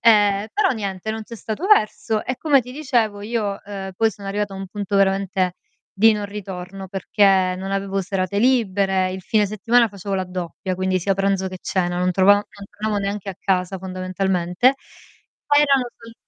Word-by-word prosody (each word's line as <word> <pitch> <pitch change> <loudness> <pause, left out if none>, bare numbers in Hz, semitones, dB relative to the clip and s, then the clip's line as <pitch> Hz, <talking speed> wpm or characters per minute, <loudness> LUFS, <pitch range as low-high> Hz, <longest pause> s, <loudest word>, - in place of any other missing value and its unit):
Ehm, 205 -2 +4
però 405 -2 +3
niente, 200 -3 -3
non 220 0 -4
c'è 230 - -9
stato 225 - -4
verso, 215 - +2
e 255 - -2
come 285 -5 +3
ti 250 - -10
dicevo 240 -8 0
io, 210 -2 -2
uhm, 195 -1 -6
poi 225 +3 +2
sono 200 -2 -11
arrivata 205 0 -2
a - - -7
un 195 0 -6
punto 200 +1 -3
veramente 195 -1 +1 0.5
di 225 +2 +7
non 210 -1 -3
ritorno, 195 -1 -7
perché 190 -1 +2
non 195 +1 -4
avevo 195 0 -1
serate 190 +1 -2
libere. 195 -6 +2
Il 190 +1 -5
fine 210 +3 +1
settimana 230 +4 +2
facevo 200 -1 -5
la 190 - 0
doppia, 180 0 -5
quindi 185 0 0
sia 195 +3 +1
pranzo 195 0 0
che 185 0 -8
cena, 175 -2 -1
non 180 0 +1
trova 190 +2 +6
non 205 - 0 0.3
tornavo 210 0 -2
neanche 200 0 -3
a 195 - -4
casa 190 0 0
fondamentalmente. 185 +4 0 0.7
Poi 290 0 +4
erano 275 -4 +3
sul 230 0 -13
195 Hz, 185 wpm, -21 LUFS, 190-220 Hz, 0.7 s, di